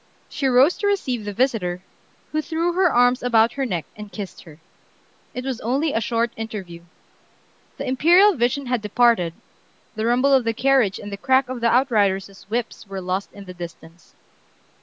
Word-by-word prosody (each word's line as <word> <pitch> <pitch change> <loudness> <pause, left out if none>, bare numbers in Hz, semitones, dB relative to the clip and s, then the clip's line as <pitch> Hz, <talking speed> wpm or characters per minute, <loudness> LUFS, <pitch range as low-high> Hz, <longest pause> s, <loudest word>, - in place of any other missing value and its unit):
She 275 - -2
rose 260 +6 +4
to 410 - 0
receive 255 - -1
the 205 - -3
visitor, 195 -6 -1 0.5
who 310 - 0
threw 335 +2 -1
her 365 -1 +3
arms 245 +1 +3
about 230 -2 +3
her 270 -1 -2
neck 175 -7 -3
and 210 -1 -10
kissed 195 +1 -7
her. 155 -3 -14 0.8
It 250 +1 -5
was 265 -3 -4
only 275 +7 0
a 225 - 0
short 230 +1 0
interview. 200 -6 -7 1.0
The - - -5
imperial 345 +10 +5
vision 250 +1 0
had 250 -2 -1
departed, 210 -5 +2 0.6
the 220 +1 -1
rumble 255 +4 +3
of 265 -2 +4
the 230 0 -1
carriage 255 -6 +2
and 205 - -8
the 200 - -5
crack 260 +5 +2
of 255 -2 -5
the 235 - +3
outriders' 200 -7 +1
whips 230 -2 -4
were 195 -1 -6
lost 185 +2 -3
in 200 -1 -11
the 180 - -9
distance. 170 -1 -11
235 Hz, 180 wpm, -22 LUFS, 200-265 Hz, 1.0 s, imperial